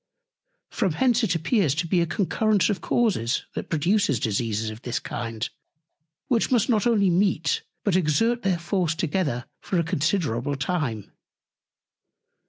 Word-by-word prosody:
From 190 -8 0
hence 245 - +2
it 180 -6 +1
appears 165 - +1
to 170 +3 -1
be 175 +1 +2
a 170 - +1
Concurrence 205 +4 +1
of 200 - -3
Causes, 185 - 0
that - - -5
produces 165 - +1
Diseases 110 0 -1
of 110 +1 -10
this 120 - -3
Kind; 115 -1 -4 0.8
which 235 -3 +1
must 245 -1 +2
not 220 -2 +2
only 205 -6 +3
meet, 175 -2 +1 0.2
but 200 -4 +1
exert 225 +8 +2
their 190 -4 +1
Force 170 -1 -1
together 155 -7 -1
for 185 - -2
a 170 - +2
considerable 145 - 0
time. 135 - -2
170 Hz, 145 wpm, -25 LUFS, 140-205 Hz, 0.8 s, only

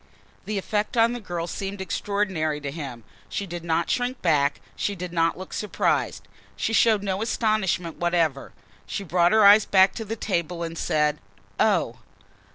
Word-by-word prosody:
The 210 -1 -2
effect 210 +4 -2
on 230 +1 +4
the 245 - -4
girl 175 -5 -4
seemed 195 +3 -5
extraordinary 190 -6 -1
to 140 -1 -4
him. 135 -7 -7 0.3
She 200 - -3
did 175 -2 -7
not 165 0 0
shrink 245 +1 -1
back, 145 -4 +2 0.2
she 205 - -2
did 180 -1 -6
not 165 -1 +1
look 185 0 -9
surprised. 210 - -1 0.3
She 225 - -2
showed 220 -2 +4
no 195 0 -2
astonishment 215 -7 0
whatever. 170 -5 0 0.4
She 200 - -4
just 180 - -15
brought 175 0 +4
her 220 -1 +5
eyes 205 +1 +8
back 190 0 +5
to 225 - -5
the 220 +1 -4
table 175 -5 -2
and 165 0 -5
said: 150 -2 0 0.4
"Oh!" - - +2
185 Hz, 170 wpm, -25 LUFS, 165-210 Hz, 0.4 s, eyes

